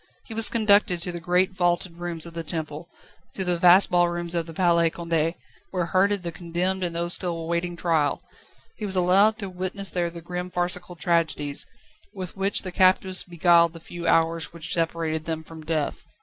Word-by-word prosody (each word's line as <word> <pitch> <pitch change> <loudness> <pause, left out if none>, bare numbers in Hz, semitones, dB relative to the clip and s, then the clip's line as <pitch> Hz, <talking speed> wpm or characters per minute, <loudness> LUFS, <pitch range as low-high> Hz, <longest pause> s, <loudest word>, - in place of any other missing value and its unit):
He 225 - -8
was 225 0 +6
conducted 205 -5 +4
to 180 - -3
the 175 - -6
great 180 +3 +1
vaulted 175 -1 -1
rooms 170 -2 -1
of 170 - -10
the 165 - -4
Temple, 160 0 -5 0.5
to 190 - -2
the 175 -1 0
vast 180 +3 +6
ballrooms 175 -1 +1
of 170 -1 -1
the 165 - -9
Palais 170 -2 +3
Condé, 165 0 -1 0.3
where 180 -2 -2
herded 195 +2 +1
the 170 - -3
condemned 180 +3 -2
and 170 -2 -3
those 170 +1 0
still 175 -3 -2
awaiting 170 +1 -3
trial; 160 -4 0 0.6
he - - -8
was 190 - +1
allowed 195 +4 +4
to 200 - -5
witness 185 +2 -2
there 175 -1 -1
the 170 0 -9
grim 180 +2 -5
farcical 180 0 -2
tragedies, 160 -4 -1 0.5
with 185 -3 -6
which 195 +1 0
the 185 - -4
captives 185 0 +2
beguiled 170 -1 +3
the 165 - -10
few 170 +1 -7
hours 165 0 +2
which 170 -1 -6
separated 165 -2 -1
them 160 -1 -4
from 160 0 -12
death. 155 -2 -2
175 Hz, 190 wpm, -24 LUFS, 165-185 Hz, 0.6 s, was